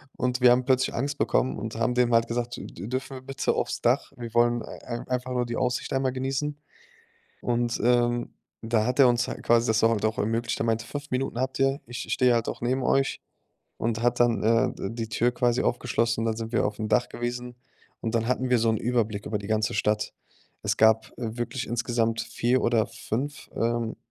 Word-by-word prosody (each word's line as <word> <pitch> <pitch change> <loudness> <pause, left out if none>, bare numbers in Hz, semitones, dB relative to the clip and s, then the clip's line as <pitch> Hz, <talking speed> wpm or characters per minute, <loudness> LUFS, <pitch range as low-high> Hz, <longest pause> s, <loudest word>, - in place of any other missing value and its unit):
Und 125 0 -1
wir 125 - +8
haben 125 +1 +4
plötzlich 130 0 +2
Angst 140 +3 -2
bekommen 130 - +1
und 110 +1 -5
haben 115 +2 0
dem 125 -1 +3
halt 115 0 +4
gesagt: 120 0 -3
„D - - -7 0.2
dürfen 130 +1 -4
wir - - -10
bitte 135 0 -1
aufs - - -2
Dach? 125 +4 +2
Wir 120 -3 -7
wollen 120 0 +3
ei 120 -1 -7
einfach 125 0 -2
nur 125 -1 0
die 120 - -3
Aussicht 125 -1 -1
einmal 135 -1 +1
genießen." 135 +3 -2 0.8
Und, 120 -1 0
ähm, 120 0 +2 0.3
da 110 -1 +1
hat 125 +2 -1
er 135 - +8
uns 120 0 +1
halt - - -6
quasi 120 +1 +3
das 110 0 +2
auch 115 - +5
halt 110 -2 0
auch 110 - -2
ermöglicht. 115 +2 -1
Er - - +1
meinte: 115 0 0
„5 145 +3 -6
Minuten 130 -1 -1
habt 130 0 -2
ihr. 135 +2 +2
Ich 120 0 -6
ich - - 0
stehe 125 -2 +4
halt 115 -1 0
auch - - -5
neben 130 +2 0
euch". 135 +1 +1 0.6
Und 115 0 -1
hat 120 0 +1
dann, 115 -4 +3
äh, 115 +1 +3
d 95 - -4
die 115 -1 -4
Tür 120 +1 +1
quasi 120 0 +1
aufgeschlossen, 115 -1 0
dann 110 -1 0
sind 115 0 -5
wir 120 - +2
aufm 110 +1 -3
Dach 125 +2 +2
gewesen. 120 0 -5 0.4
Und 115 0 -3
dann 115 0 +1
hatten 125 0 0
wir 125 - +5
so 115 0 +2
'nen - - +1
Überblick 110 -3 -1
über 105 - -1
die 100 - -8
ganze 110 -2 +1
Stadt. 105 0 0 0.5
Es - - 0
gab, 110 0 +4
äh, 115 -1 -4
wirklich 125 +2 -3
insgesamt 115 -1 0
4 120 +2 0
oder 115 -3 +2
5, 140 +6 -4
ähm 115 -1 -1
120 Hz, 215 wpm, -26 LUFS, 115-125 Hz, 0.8 s, wir